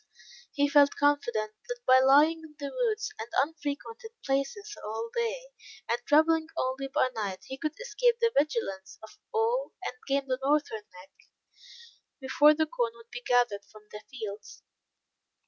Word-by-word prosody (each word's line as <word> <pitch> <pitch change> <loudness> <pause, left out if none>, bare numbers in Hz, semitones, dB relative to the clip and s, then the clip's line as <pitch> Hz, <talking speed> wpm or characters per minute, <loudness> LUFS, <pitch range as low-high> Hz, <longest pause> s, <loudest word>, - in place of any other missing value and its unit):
He 285 -1 +2
felt 285 -1 +5
confident, 240 -7 +1 0.2
that - - -4
by 260 0 +7
lying 290 +5 +5
in 315 -2 -14
the 285 -2 -6
woods 450 -3 -1
and 225 +1 -6
unfrequented 315 - -3 0.2
places 275 +11 -2
all 225 +2 -4
day, - - -2 0.4
and 235 +1 0
traveling 315 +2 +4
only 260 +1 -1
by 270 -1 +1
night, 200 -5 -4
he 265 - -7
could 310 -1 -4
escape 485 0 +1
the 465 0 +2
vigilance 195 - -1
of 220 - -13
all 470 +2 0
pursuit; - - -3
and 250 - -26
gain 275 0 0
the 255 -1 -1
Northern 275 -6 0
Neck, 185 +1 -15 1.1
before 295 +3 +5
the 315 +1 +2
corn 245 -8 -2
would 230 0 -17
be 245 0 -6
gathered 240 -5 +2
from 215 -1 -15
the 210 - -8
fields. 215 -6 -8
280 Hz, 160 wpm, -29 LUFS, 240-325 Hz, 1.1 s, by